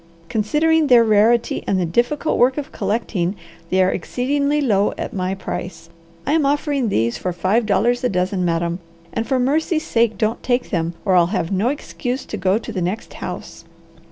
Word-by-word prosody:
Considering 300 +8 +2
their 245 -3 +7
rarity 225 +2 +3
and 190 - +1
the 180 - +1
difficult 245 - 0
work 255 +3 +4
of 295 +1 -4
collecting, 200 -3 -1 0.3
they 185 0 +3
are 185 - +2
exceedingly 280 - 0
low 210 -8 +2
at - - -5
my 185 0 -2
price. 175 -2 -6 0.3
I 285 - +1
am 320 -1 +3
offering 280 -3 0
these 115 - 0
for 180 - -2
five 200 +6 +1
dollars 235 +5 +2
a 250 - +2
dozen, 185 0 0
madam, 170 0 0 0.3
and 225 0 -2
for 265 -2 +1
mercy 305 +6 +1
sake 235 -7 +1
don't 220 +1 -1
take 245 0 -1
them 170 -3 -1
or 195 - +2
I'll 175 -1 +5
have 180 -3 -2
no 195 +4 +1
excuse 260 -2 -4
to - - -6
go 190 +1 +2
to 230 - -6
the 190 -4 -3
next 185 +6 -3
house." - - -7
220 Hz, 185 wpm, -20 LUFS, 185-255 Hz, 0.3 s, their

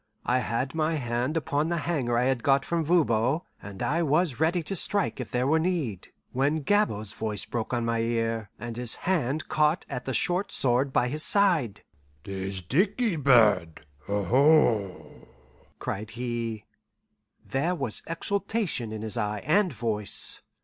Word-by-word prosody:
I 125 +1 +2
had 130 +2 -2
my 160 0 0
hand 125 +2 -1
upon 150 0 0
the 170 - 0
hanger 140 -7 -1
I 120 - +2
had 130 -1 +1
got 135 +2 +3
from 170 -1 0
Voban, 145 -4 +2 0.2
and 100 -2 -7
I 165 +4 +1
was 155 -3 +1
ready 165 +2 +1
to 195 - -4
strike 200 +2 0
if - - -5
there 125 0 0
were 160 +4 +3
need, 160 - -2 0.2
when 145 +4 0
Gabord's 110 - +1
voice 110 -2 -3
broke 115 -2 -4
on 120 -2 0
my 115 0 0
ear, 115 -2 -1
and 120 -1 -7
his 120 -2 -3
hand 155 -5 0
caught 155 +3 +1
at 125 -3 -5
the 130 - -2
short 180 +3 0
sword 130 +2 +3
by 125 - +2
his 150 +5 -1
side. 160 - +2 0.4
"'Tis 95 -1 -5
dickey 195 - +1
bird, 105 - +3 0.2
aho!" 110 - +2 0.5
cried 105 +2 -4
he. 115 -2 -4 0.8
There 160 +7 0
was 135 -9 0
exultation 195 - -1
in 110 0 -5
his 110 +2 -3
eye 105 -2 -2
and 180 +5 +3
voice. 105 -3 -2
130 Hz, 155 wpm, -27 LUFS, 115-160 Hz, 0.8 s, got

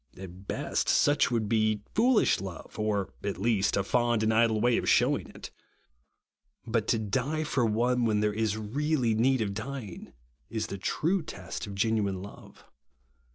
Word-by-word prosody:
At 95 +1 -10
best, - - -1
such 145 +1 +3
would 115 -3 0
be 110 -1 +1
foolish 240 +1 +3
love, 95 +2 -8
or, 105 -2 -1
at 100 -1 -2
least, 105 -1 +1
a 100 - +1
fond 120 +1 +1
and 110 0 +2
idle 110 -1 +3
way 120 +1 +3
of - - -1
shewing - - +3
it. - - -10 1.1
But 115 -2 -1
to 115 - +2
die 135 +9 -1
for 135 -6 +1
one, 120 +3 +1
when 110 -2 +2
there 105 0 +1
is 110 -1 -1
really 125 +3 0
need 125 +3 +2
of 100 -2 -1
dying, 110 -2 -7 0.4
is 110 -1 -2
the 100 - -6
true 170 - 0
test 100 - -7
of 100 - -7
genuine 100 -3 0
love. 100 - -13
110 Hz, 165 wpm, -28 LUFS, 100-125 Hz, 1.1 s, such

